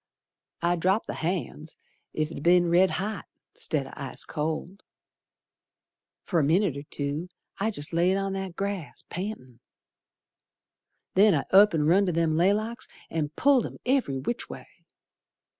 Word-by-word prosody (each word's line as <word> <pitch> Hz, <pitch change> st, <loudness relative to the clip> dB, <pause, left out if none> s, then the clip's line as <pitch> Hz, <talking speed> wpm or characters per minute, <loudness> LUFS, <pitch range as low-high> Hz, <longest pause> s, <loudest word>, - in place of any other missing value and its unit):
I 175 Hz, +1 st, +2 dB
dropped 190 Hz, +6 st, +1 dB
the -, -, -4 dB
hand's 160 Hz, -2 st, -4 dB, 0.4 s
ef 155 Hz, 0 st, 0 dB
it'd 155 Hz, -, -7 dB
be'n 175 Hz, +1 st, +4 dB
red 185 Hz, +2 st, +5 dB
hot 205 Hz, -1 st, -3 dB, 0.3 s
'Stead 145 Hz, -4 st, -2 dB
o' -, -, -10 dB
ice 140 Hz, -2 st, -5 dB
cold. 160 Hz, +6 st, -4 dB, 1.4 s
Fer 175 Hz, -, +1 dB
a -, -, +2 dB
minit 165 Hz, +2 st, +2 dB
or 140 Hz, -, -5 dB
two 145 Hz, +4 st, -4 dB, 0.3 s
I 210 Hz, +3 st, +1 dB
jest 150 Hz, -7 st, -4 dB
laid 180 Hz, +3 st, +3 dB
on 195 Hz, 0 st, -2 dB
that 190 Hz, -2 st, -4 dB
grass 195 Hz, -5 st, -4 dB
Pantin'. 175 Hz, -, -6 dB, 1.5 s
Then 200 Hz, -1 st, +5 dB
I 140 Hz, -, 0 dB
up 200 Hz, -1 st, +7 dB
and 150 Hz, -1 st, +1 dB
run 190 Hz, +4 st, +4 dB
to -, -, +2 dB
them 165 Hz, -1 st, +1 dB
laylocks 215 Hz, +8 st, +1 dB, 0.2 s
An' 155 Hz, -3 st, -1 dB
pulled 275 Hz, -2 st, +4 dB
'em -, -, -11 dB
every 250 Hz, -, +1 dB
which 235 Hz, -, -3 dB
way. -, -, -8 dB
175 Hz, 150 wpm, -27 LUFS, 155-200 Hz, 1.5 s, up